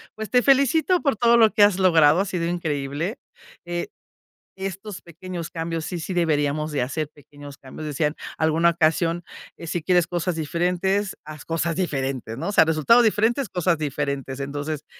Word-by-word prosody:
Pues, 215 Hz, 0 st, -6 dB
te 250 Hz, -, +4 dB
felicito 280 Hz, +7 st, +3 dB
por 275 Hz, -7 st, 0 dB
todo 235 Hz, +1 st, +4 dB
lo 225 Hz, -2 st, +5 dB
que 210 Hz, -, +2 dB
has 205 Hz, -2 st, +6 dB
logrado, 165 Hz, -3 st, +5 dB
ha -, -, -1 dB
sido 180 Hz, -3 st, -2 dB
increíble, 160 Hz, -, -3 dB, 0.5 s
eh, 175 Hz, 0 st, -4 dB, 0.7 s
estos 195 Hz, +1 st, -6 dB
pequeños 170 Hz, 0 st, -7 dB
cambios 165 Hz, -1 st, -4 dB
sí 170 Hz, +2 st, -4 dB
sí 185 Hz, -, -5 dB
deberíamos 155 Hz, -3 st, 0 dB
de 145 Hz, -, -1 dB
hacer 145 Hz, +4 st, -3 dB
pequeños 145 Hz, -1 st, -13 dB
cambios. 135 Hz, +3 st, -10 dB
Decían 150 Hz, +1 st, -1 dB, 0.2 s
alguna 160 Hz, +2 st, +3 dB
ocasión: 165 Hz, +1 st, +1 dB, 0.3 s
"Si 170 Hz, 0 st, -4 dB
quieres 175 Hz, -1 st, +3 dB
cosas 175 Hz, -1 st, -2 dB
diferentes, 180 Hz, +5 st, -1 dB
haz 150 Hz, -2 st, -9 dB
cosas 165 Hz, 0 st, -2 dB
diferentes", 135 Hz, -9 st, -3 dB
¿no? -, -, -4 dB
O -, -, -1 dB
sea, -, -, +7 dB
resultados 160 Hz, -, +4 dB
diferentes, 225 Hz, +2 st, +1 dB
cosas 180 Hz, -1 st, 0 dB
diferentes. 140 Hz, -2 st, -3 dB
Entonces, 145 Hz, +2 st, -4 dB
170 Hz, 165 wpm, -23 LUFS, 150-190 Hz, 0.7 s, sea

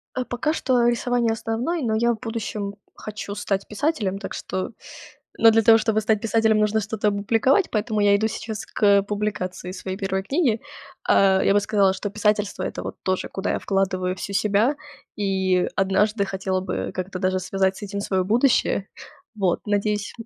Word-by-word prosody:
А, 255 Hz, -, -1 dB
пока 250 Hz, +6 st, -1 dB
что 250 Hz, -6 st, +2 dB
рисование- 240 Hz, -1 st, +1 dB
основной, 235 Hz, +9 st, -2 dB
но 220 Hz, -2 st, 0 dB
я 235 Hz, +2 st, +2 dB
в 220 Hz, -, -5 dB
будущем 215 Hz, -3 st, -4 dB, 0.2 s
хочу 210 Hz, -1 st, -6 dB
стать 200 Hz, -1 st, -2 dB
писателем. 210 Hz, -6 st, -1 dB
Так 200 Hz, -, -6 dB
что 185 Hz, +3 st, -4 dB, 0.7 s
но 225 Hz, -, +7 dB
для 225 Hz, 0 st, +4 dB
того, 225 Hz, +1 st, +7 dB
чтобы 215 Hz, -1 st, +1 dB
стать 215 Hz, 0 st, +1 dB
писателем, 220 Hz, -1 st, +2 dB
нужно 210 Hz, +1 st, +2 dB
что-то 215 Hz, 0 st, -1 dB
опубликовать, 225 Hz, -, +2 dB
поэтому 215 Hz, -1 st, -1 dB
я 200 Hz, 0 st, +5 dB
иду 220 Hz, +2 st, 0 dB
сейчас 220 Hz, -1 st, -6 dB
к 200 Hz, -1 st, +3 dB
публикации 200 Hz, -3 st, -3 dB
своей 190 Hz, 0 st, -5 dB
1 190 Hz, -1 st, -2 dB
книги. 260 Hz, -, +1 dB, 0.5 s
Э, 190 Hz, -1 st, +5 dB
я 195 Hz, -, +4 dB
бы 205 Hz, -, +5 dB
сказала, 200 Hz, -2 st, +2 dB
что 205 Hz, +1 st, -4 dB
писательство- 210 Hz, -1 st, 0 dB
это -, -, -4 dB
вот -, -, -6 dB
тоже, 185 Hz, 0 st, -1 dB
куда 195 Hz, -, -3 dB
я -, -, -1 dB
вкладываю 185 Hz, -1 st, 0 dB
всю 200 Hz, -, -6 dB
себя. 210 Hz, +8 st, +2 dB, 0.4 s
И 190 Hz, -3 st, +1 dB
однажды 200 Hz, +2 st, +2 dB
хотела 190 Hz, -1 st, -2 dB
бы 185 Hz, -1 st, -3 dB
как-то 185 Hz, 0 st, -4 dB
даже 185 Hz, 0 st, +1 dB
связать 190 Hz, +1 st, 0 dB
с -, -, -11 dB
этим 200 Hz, 0 st, -4 dB
своё 190 Hz, -2 st, 0 dB
будущее. 230 Hz, -2 st, +2 dB, 0.5 s
Вот, 190 Hz, 0 st, 0 dB
надеюсь 205 Hz, 0 st, 0 dB
205 Hz, 175 wpm, -23 LUFS, 195-225 Hz, 0.7 s, но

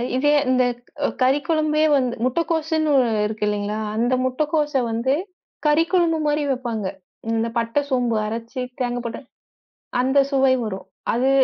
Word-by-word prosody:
இதே 290 Hz, +3 st, +3 dB
அந்தக் 250 Hz, -2 st, +1 dB, 0.2 s
ஓ -, -, +3 dB
கறிக் 265 Hz, +2 st, +2 dB
குழம்பே 310 Hz, -1 st, +2 dB
வந்து 255 Hz, -3 st, +1 dB
முட்டக்கோசுன்னு 315 Hz, +2 st, 0 dB, 0.3 s
இருக்கு 215 Hz, 0 st, -2 dB
இல்லிங்களா, 210 Hz, +1 st, -1 dB, 0.2 s
அந்த 240 Hz, +3 st, +1 dB
முட்டக்கோச 295 Hz, +3 st, 0 dB, 0.2 s
வந்து, 235 Hz, +4 st, +1 dB, 0.5 s
கறி 300 Hz, +2 st, +4 dB
குழம்பு 335 Hz, -3 st, +2 dB
மாரி 295 Hz, 0 st, +1 dB
வெப்பாங்க. 235 Hz, -6 st, -2 dB, 0.4 s
இந்தப் 230 Hz, +1 st, -1 dB
பட்ட, 230 Hz, +5 st, +1 dB
சோம்பு 245 Hz, -3 st, +1 dB
அரைச்சு, 230 Hz, +4 st, -4 dB, 0.2 s
தேங்கா 245 Hz, -1 st, -1 dB
போட்டு 230 Hz, -, -5 dB, 0.8 s
அந்த 265 Hz, +2 st, +2 dB
சுவை 270 Hz, -1 st, +3 dB
வரும். 195 Hz, -3 st, -5 dB, 0.3 s
அது, 255 Hz, +3 st, +2 dB
255 Hz, 135 wpm, -22 LUFS, 230-295 Hz, 0.8 s, கறி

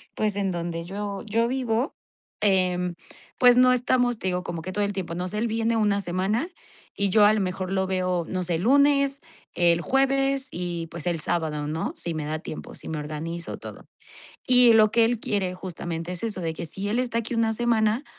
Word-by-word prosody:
pues 210 Hz, -2 st, 0 dB
en 195 Hz, -2 st, -1 dB
donde 170 Hz, -1 st, -4 dB
yo 200 Hz, +1 st, -5 dB
yo 230 Hz, +2 st, +1 dB
vivo, 250 Hz, +1 st, -1 dB, 0.5 s
eh, 180 Hz, -3 st, +2 dB, 0.5 s
pues 245 Hz, -1 st, +7 dB
no 255 Hz, 0 st, +6 dB
estamos, 245 Hz, -1 st, +2 dB
te -, -, -2 dB
digo, 180 Hz, -1 st, -1 dB
como 170 Hz, -2 st, -5 dB
que 185 Hz, +3 st, -6 dB
todo 205 Hz, +2 st, 0 dB
el 200 Hz, 0 st, -1 dB
tiempo, 175 Hz, -3 st, -4 dB
no 180 Hz, +1 st, -3 dB
sé, 210 Hz, +3 st, -4 dB
él 230 Hz, +2 st, 0 dB
viene 225 Hz, +1 st, 0 dB
una 205 Hz, -2 st, +2 dB
semana 195 Hz, -, -1 dB, 0.5 s
y 200 Hz, -1 st, +1 dB
yo 210 Hz, +2 st, +5 dB
a 210 Hz, -, +6 dB
lo 215 Hz, -, +1 dB
mejor 185 Hz, -1 st, -3 dB
lo 190 Hz, -1 st, +1 dB
veo, 185 Hz, -2 st, 0 dB
no 185 Hz, -1 st, -2 dB
sé, 170 Hz, -1 st, 0 dB
el 165 Hz, -, -3 dB
Lunes, 280 Hz, +2 st, +3 dB, 0.3 s
el 170 Hz, -1 st, +3 dB
Jueves 270 Hz, +1 st, +2 dB
y, 175 Hz, -1 st, -4 dB
pues, 170 Hz, 0 st, -5 dB
el 170 Hz, -2 st, 0 dB
Sábado, 155 Hz, -3 st, -1 dB
¿no?, 160 Hz, +2 st, -3 dB
si 170 Hz, -, -3 dB
me 155 Hz, -2 st, -4 dB
da 155 Hz, +1 st, -3 dB
tiempo, 155 Hz, -, -8 dB
si -, -, -7 dB
me 160 Hz, -, -3 dB
organizo, 160 Hz, +3 st, -5 dB
todo. -, -, -10 dB, 0.6 s
Y 250 Hz, -2 st, +6 dB
lo 215 Hz, -1 st, +5 dB
que 230 Hz, -, +4 dB
él 235 Hz, -1 st, 0 dB
quiere 190 Hz, -5 st, -1 dB
justamente 170 Hz, -2 st, -5 dB
es 180 Hz, -, -4 dB
eso, 215 Hz, -5 st, -3 dB
de 165 Hz, -1 st, -2 dB
que 160 Hz, -, -6 dB
si 195 Hz, +5 st, -5 dB
él 230 Hz, +4 st, 0 dB
está 240 Hz, -2 st, -1 dB
aquí 230 Hz, +1 st, -3 dB
una 225 Hz, -1 st, +1 dB
semana, 225 Hz, +1 st, +1 dB
195 Hz, 215 wpm, -25 LUFS, 175-230 Hz, 0.6 s, pues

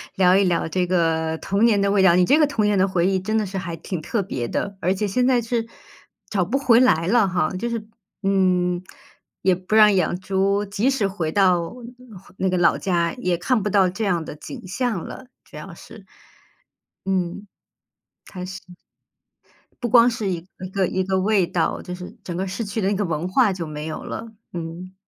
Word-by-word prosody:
聊 185 Hz, 0 st, +5 dB
一 200 Hz, -, +4 dB
聊 175 Hz, -2 st, +1 dB
这 180 Hz, +2 st, 0 dB
个 160 Hz, -2 st, +1 dB
童 200 Hz, +3 st, +1 dB
年 210 Hz, -4 st, +3 dB
的 200 Hz, -, +2 dB
味 200 Hz, -1 st, +3 dB
道， 190 Hz, -2 st, +6 dB
你 180 Hz, -, +4 dB
这 285 Hz, -, +4 dB
个 300 Hz, -, +5 dB
童 255 Hz, -7 st, -1 dB
年 205 Hz, -1 st, +2 dB
的 190 Hz, -, +4 dB
回 180 Hz, -3 st, +1 dB
忆 190 Hz, -1 st, +1 dB
真 215 Hz, +4 st, -1 dB
的 215 Hz, -, +1 dB
是 195 Hz, +1 st, -5 dB
还 175 Hz, -3 st, -4 dB
挺 165 Hz, +1 st, -5 dB
特 210 Hz, +5 st, -1 dB
别 130 Hz, -10 st, -4 dB
的， 200 Hz, +8 st, -3 dB
而 185 Hz, +3 st, +2 dB
且 205 Hz, +2 st, -2 dB
现 250 Hz, +6 st, +1 dB
在 250 Hz, -2 st, +3 dB
是 230 Hz, 0 st, -2 dB, 0.6 s
找 195 Hz, -5 st, 0 dB
不 240 Hz, +9 st, 0 dB
回 250 Hz, -4 st, +4 dB
来 170 Hz, -10 st, +3 dB
了 220 Hz, 0 st, +4 dB
哈， 175 Hz, -4 st, 0 dB
就 235 Hz, +6 st, -3 dB
是， 230 Hz, -2 st, -4 dB, 0.4 s
嗯， 180 Hz, -2 st, +2 dB, 0.6 s
也 185 Hz, -1 st, +3 dB
不 185 Hz, +4 st, -3 dB
让 210 Hz, -1 st, +7 dB
养 180 Hz, -1 st, +1 dB
猪， 195 Hz, +2 st, 0 dB
即 205 Hz, +5 st, 0 dB
使 265 Hz, -7 st, +1 dB
回 175 Hz, -5 st, -3 dB
到 180 Hz, -3 st, +2 dB, 0.6 s
那 190 Hz, -, 0 dB
个 185 Hz, -, 0 dB
老 175 Hz, -1 st, +3 dB
家 170 Hz, -3 st, 0 dB
也 180 Hz, -9 st, -1 dB
看 220 Hz, +7 st, +1 dB
不 210 Hz, -, -1 dB
到 195 Hz, -2 st, +3 dB
这 215 Hz, +5 st, -3 dB
样 175 Hz, -4 st, 0 dB
的 155 Hz, -, -8 dB
景 150 Hz, +3 st, -9 dB
象 220 Hz, -3 st, -2 dB
了， 260 Hz, -, -9 dB, 0.2 s
主 -, -, -13 dB
要 -, -, -9 dB
是。 -, -, -14 dB, 1.0 s
嗯， 190 Hz, +1 st, -2 dB, 0.8 s
开 180 Hz, -2 st, -7 dB
心。 190 Hz, +1 st, -7 dB, 1.2 s
不 240 Hz, -, 0 dB
光 235 Hz, +1 st, +6 dB
是 220 Hz, -4 st, -3 dB
一 175 Hz, -2 st, -2 dB, 0.3 s
个 195 Hz, -1 st, +1 dB
一 190 Hz, +1 st, -1 dB
个 190 Hz, 0 st, 0 dB
味 200 Hz, -2 st, +2 dB
道， 170 Hz, -1 st, -1 dB
就 180 Hz, -, -6 dB
是 180 Hz, 0 st, -8 dB
整 175 Hz, -, -5 dB
个 190 Hz, +2 st, -2 dB
市 195 Hz, +5 st, -4 dB
区 205 Hz, +2 st, -3 dB
的 190 Hz, -, +1 dB
那 205 Hz, -, +1 dB
个 205 Hz, +1 st, -1 dB
文 165 Hz, 0 st, -2 dB
化 210 Hz, +2 st, +3 dB
就 175 Hz, -3 st, -5 dB
没 150 Hz, 0 st, -6 dB
有 155 Hz, -, -5 dB
了， 230 Hz, -, -6 dB, 0.3 s
嗯。 175 Hz, +2 st, -7 dB
190 Hz, 225 characters per minute, -22 LUFS, 180-210 Hz, 1.2 s, 让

